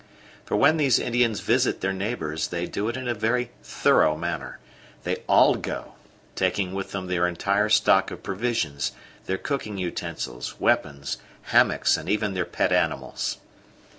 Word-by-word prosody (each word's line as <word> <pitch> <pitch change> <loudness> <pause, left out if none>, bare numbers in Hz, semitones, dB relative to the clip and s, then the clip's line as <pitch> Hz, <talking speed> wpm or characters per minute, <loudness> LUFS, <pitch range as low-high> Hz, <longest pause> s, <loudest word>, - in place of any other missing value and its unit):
For - - -1
when 155 +3 +5
these 140 -6 +4
Indians 120 -4 +1
visit 120 +6 +1
their 95 +1 0
neighbours 95 -7 -2
they 85 0 -3
do 105 +4 -2
it 120 - -3
in 130 -1 -5
a 120 - +1
very 120 +2 0
thorough 75 0 +3
manner; 85 +2 -4 0.5
they - - -1
all - - +6
go, - - -5 0.4
taking 95 0 0
with 95 0 -4
them 95 -1 -4
their 90 -1 +1
entire 100 +4 +1
stock 105 -3 +4
of - - -9
provisions, 100 - -1 0.3
their 95 - 0
cooking 110 -7 -3
utensils, 85 -8 -5
weapons, 70 -2 0 0.3
hammocks, - - +4
and - - -7
even 105 -1 0
their 90 -2 -1
pet - - 0
animals. - - 0
100 Hz, 155 wpm, -25 LUFS, 90-115 Hz, 0.5 s, all